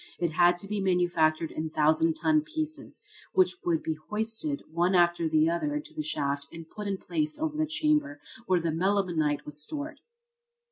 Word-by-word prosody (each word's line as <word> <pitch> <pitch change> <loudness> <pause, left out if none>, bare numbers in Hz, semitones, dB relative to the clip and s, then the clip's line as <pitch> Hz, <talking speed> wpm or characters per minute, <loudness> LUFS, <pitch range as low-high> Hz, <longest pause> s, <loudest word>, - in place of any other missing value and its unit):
It 170 -2 0
had 175 +2 +4
to 200 - -4
be 210 0 -2
manufactured 175 -4 +2
in 160 +1 -3
thousand 155 +1 +3
ton 310 -1 +3
pieces, 310 0 -4 0.3
which 185 -1 +3
would 165 -2 0
be 160 - -1 0.2
hoisted 225 +8 -2
one 175 +3 +2
after 175 -2 +3
the 155 0 +4
other 170 - 0
into 300 - -5
the - - -3
shaft 140 -2 -2
and 165 -1 -9
put 210 +4 -7
in 195 -1 -1
place 310 - -2
over 310 0 -2
the 310 0 0
chamber 300 -1 +1 0.3
where 185 -1 +3
the 165 -1 -1
melimelonite 170 -4 0
was 150 0 -4
stored. 295 - -3
180 Hz, 180 wpm, -28 LUFS, -, 0.3 s, had